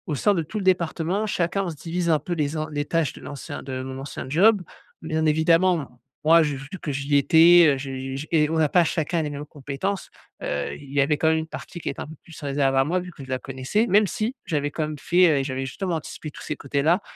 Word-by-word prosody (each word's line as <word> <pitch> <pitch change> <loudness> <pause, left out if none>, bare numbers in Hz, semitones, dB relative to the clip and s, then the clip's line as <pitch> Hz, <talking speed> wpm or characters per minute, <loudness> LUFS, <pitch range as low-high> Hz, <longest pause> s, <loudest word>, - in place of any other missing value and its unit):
sein 205 +8 +3
de 175 - 0
tout 160 +7 -6
le - - -4
département, 180 +2 +1
chacun, 195 +1 0
on - - -2
se 165 - -6
divise 170 +3 -3
un 155 -2 +4
peu 175 +4 -4
les 150 -2 -1
en 155 0 -3
les 145 -1 -2
tâches 165 -1 0
de - - -13
l'ancien 140 -2 -7
de 130 -1 -5
mon 130 0 -6
ancien 135 -1 -6
job. 200 +8 +4 0.4
Bien 160 0 -1
évidemment, 160 -4 +2 0.2
moi, 165 +2 +6
j'ai 150 -3 0
vu 135 +1 -9
que 150 - -3
j'y 140 +1 +1
étais, 165 +3 +7
heu, - - -2
je 135 0 -5
j 140 +3 -5
et 150 -2 +3
on 160 - 0
n'a 155 -2 +3
pas 175 +1 +4
chacun 165 +1 0
les 150 - -3
mêmes 145 0 -6
compétences, 150 +7 -4 0.3
heu, 70 0 -2
il 140 -1 -12
y 145 - +3
avait 145 +2 +2
quand 160 - +1
même 160 - +3
une 160 - -5
partie 175 +2 -8
qui - - -3
était 140 - -6
un - - -6
peu 160 - -10
plus 165 - -13
réservée 135 -2 +1
à - - +5
moi 175 +5 0
vu 180 0 -9
que 155 - -13
je - - -16
la 130 -1 -1
connaissais 135 - -1
même 210 +1 +4
si 235 +4 -2
j'avais 145 -4 -1
quand 155 +1 -2
même 155 -1 -6
fait, 170 -3 +4
heu, - - -2
j'avais 135 -1 -3
justement 175 +6 -3
anticipé 155 -1 -6
tous - - -12
ces 155 - -3
côtés-là, 145 +5 +1
155 Hz, 260 wpm, -24 LUFS, 140-175 Hz, 0.4 s, étais